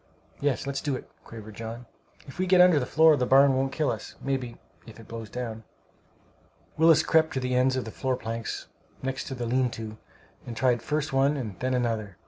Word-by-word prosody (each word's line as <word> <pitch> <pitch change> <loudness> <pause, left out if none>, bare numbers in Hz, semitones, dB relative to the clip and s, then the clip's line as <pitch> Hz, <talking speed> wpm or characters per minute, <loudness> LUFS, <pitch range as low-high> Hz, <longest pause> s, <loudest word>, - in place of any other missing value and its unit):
"Yes, 140 -4 0
let's 140 -1 -3
do 145 -3 -1
it!" - - -8 0.2
quavered 110 -1 -10
John. 115 +3 -7 0.4
"If 135 - -12
we 185 - +1
get 185 0 +5
under 180 -4 +7
the 125 - -3
floor 160 +1 +6
the 125 -3 0
barn 135 0 +6
won't 135 +1 0
kill 150 -2 0
us, 110 -2 -7
maybe, 130 -3 -3 0.3
if 115 0 -12
it 115 - -13
blows 115 -2 -7
down." 115 -2 -5 1.1
Willis 160 -1 +5
crept 160 -1 +3
to - - +1
the 125 0 -2
ends 130 +1 +3
of 130 - -2
the 110 - -6
floor 130 +2 -1
planks, 115 -2 -5 0.4
next 135 0 -3
the 125 -3 -4
lean 125 +2 +1
to, 110 -1 -8 0.5
and 115 -2 -6
tried 125 -2 +2
first 150 +2 -2
one 140 +2 +3
and 110 -9 -6
then 130 0 0
another. 110 -6 -2
130 Hz, 205 wpm, -27 LUFS, 115-140 Hz, 1.1 s, under